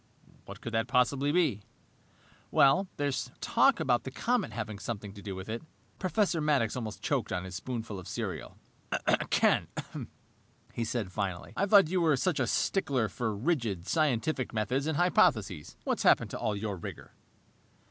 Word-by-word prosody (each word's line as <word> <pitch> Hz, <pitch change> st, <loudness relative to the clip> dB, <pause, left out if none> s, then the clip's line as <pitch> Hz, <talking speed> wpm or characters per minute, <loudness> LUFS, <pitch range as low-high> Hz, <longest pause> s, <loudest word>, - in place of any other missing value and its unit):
"What -, -, -10 dB
could 115 Hz, -, -6 dB
that 115 Hz, +1 st, +1 dB
possibly 135 Hz, +3 st, +2 dB
be?" 155 Hz, -, +2 dB, 1.4 s
"There's 140 Hz, -3 st, -1 dB
talk 275 Hz, -2 st, +3 dB
about 120 Hz, -2 st, +2 dB
the -, -, -6 dB
comet 230 Hz, -, 0 dB
having 110 Hz, -1 st, -5 dB
something 105 Hz, -3 st, -5 dB
to 100 Hz, -, -11 dB
do 100 Hz, -2 st, -5 dB
with 95 Hz, 0 st, -7 dB
it." 115 Hz, +2 st, -4 dB, 0.4 s
Professor 185 Hz, -3 st, +1 dB
Maddox 140 Hz, -7 st, +2 dB
almost 110 Hz, -4 st, -5 dB
choked -, -, 0 dB
on 90 Hz, -1 st, -1 dB
his 95 Hz, 0 st, -8 dB
spoonful 110 Hz, +1 st, -4 dB
of 90 Hz, -, -10 dB
cereal. -, -, -5 dB, 0.7 s
"Ken," -, -, +3 dB, 1.1 s
he 115 Hz, -, -2 dB
laughed 105 Hz, -6 st, -2 dB
finally, 95 Hz, -3 st, -3 dB
"I 200 Hz, -, +1 dB
thought 195 Hz, -5 st, +6 dB
you 185 Hz, -1 st, +2 dB
were 155 Hz, -4 st, +4 dB
such 160 Hz, +2 st, 0 dB
a 125 Hz, -, +1 dB
stickler 130 Hz, -, +1 dB
for 110 Hz, -4 st, -2 dB
rigid, 115 Hz, -, -1 dB
scientific 135 Hz, -4 st, 0 dB
methods 125 Hz, +7 st, 0 dB
and 160 Hz, -2 st, 0 dB
hypotheses! 110 Hz, -, +2 dB
What's -, -, -1 dB
happened -, -, +4 dB
to -, -, -5 dB
all 105 Hz, -, 0 dB
your 100 Hz, -1 st, -3 dB
rigor?" 85 Hz, -, -8 dB
120 Hz, 160 wpm, -30 LUFS, 105-150 Hz, 1.4 s, thought